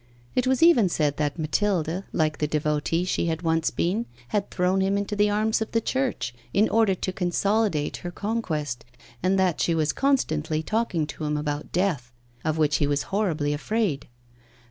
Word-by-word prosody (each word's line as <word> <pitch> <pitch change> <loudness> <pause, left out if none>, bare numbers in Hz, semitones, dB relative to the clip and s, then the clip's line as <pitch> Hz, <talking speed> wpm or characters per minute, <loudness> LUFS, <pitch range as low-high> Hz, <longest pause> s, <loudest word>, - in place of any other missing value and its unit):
It 250 0 +1
was 260 +3 +3
even 280 - +6
said 150 -4 0
that 150 0 -1
Mathilde, 175 +2 0
like 155 -2 0
the 150 - +1
devotee 150 +2 0
she 185 - 0
had 160 +1 -2
once 165 -1 +2
been, 210 +7 -1 0.2
had 205 -2 -1
thrown 185 +1 +1
him 195 +1 +1
into 200 +1 -2
the 205 0 +3
arms 215 +2 +1
of 220 - -3
the 230 - +4
Church, 260 - -1 0.2
in 210 +2 +5
order 220 -4 +3
to 185 +1 -3
consolidate 190 -2 0
her 175 - -6
conquest, 160 - -3 0.4
and 190 +1 +2
that 185 -4 +2
she 170 - +2
was 155 -1 +1
constantly 160 - 0
talking 215 -6 0
to 155 +1 -6
him 150 0 0
about 150 0 -3
death, 165 -10 0 0.3
of 155 0 0
which 150 -2 +3
he 145 - +1
was 145 0 0
horribly 165 -8 +1
afraid. 180 -1 -1
175 Hz, 180 wpm, -25 LUFS, 150-210 Hz, 0.4 s, even